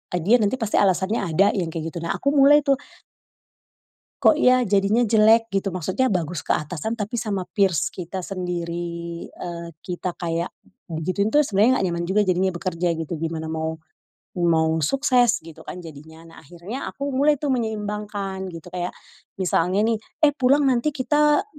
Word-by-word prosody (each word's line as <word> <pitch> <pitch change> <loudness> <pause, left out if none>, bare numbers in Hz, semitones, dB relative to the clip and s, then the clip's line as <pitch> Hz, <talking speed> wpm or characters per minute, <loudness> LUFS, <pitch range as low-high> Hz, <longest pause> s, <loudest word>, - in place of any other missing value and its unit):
eee, 175 - -1
dia 220 +7 +5
nanti 215 +3 +1
pasti 220 -3 -1
alasannya 195 +2 +2
ada 185 +3 +3
yang 175 -4 -1
kayak 165 0 -4
gitu. 170 - -4
Nah, 170 - -1
aku 280 - 0
mulai 290 +2 +6
tuh 275 -1 +3 1.5
kok 310 - +6
ya 255 -3 +5
jadinya 205 +1 +2
jelek 225 0 +4
gitu, 195 -1 -1
maksudnya 185 +8 -1
bagus 175 - -2
ke - - +2
atasan 165 +8 -3
tapi 225 +1 -4
sama 205 -5 -2 0.2
peers 185 -6 +2
kita 185 +1 -6
sendiri, 170 -2 -4
eee, 170 -1 -7
kita 180 0 -4
kayak 170 0 -3 0.3
digituin 185 +6 -2
tuh 300 - +6
sebenarnya 225 0 +3
nggak - - +1
nyaman 170 0 -2
juga 195 +4 +2
jadinya 190 -1 +1
bekerja 175 -1 -1
gitu, 165 +1 -4
gimana 160 0 -4
mau 160 0 -3 0.6
mau 160 -1 +2
sukses 245 - +2
gitu 165 -2 -12
kan 180 - -8
jadinya. 160 +1 -12
Nah, 165 0 -15
akhirnya 175 - -7
aku 280 0 -4
mulai 290 +3 +3
tuh 280 0 -1
menyeimbangkan 210 -4 -3
gitu, 170 +1 -10
kayak 180 0 -4 0.4
misalnya 185 +2 +1
nih, 225 -1 +1 0.3
"Eh 290 - +5
pulang 280 +1 +3
nanti 255 0 +2
kita, 295 +2 +2
190 Hz, 165 wpm, -23 LUFS, 170-230 Hz, 1.5 s, mulai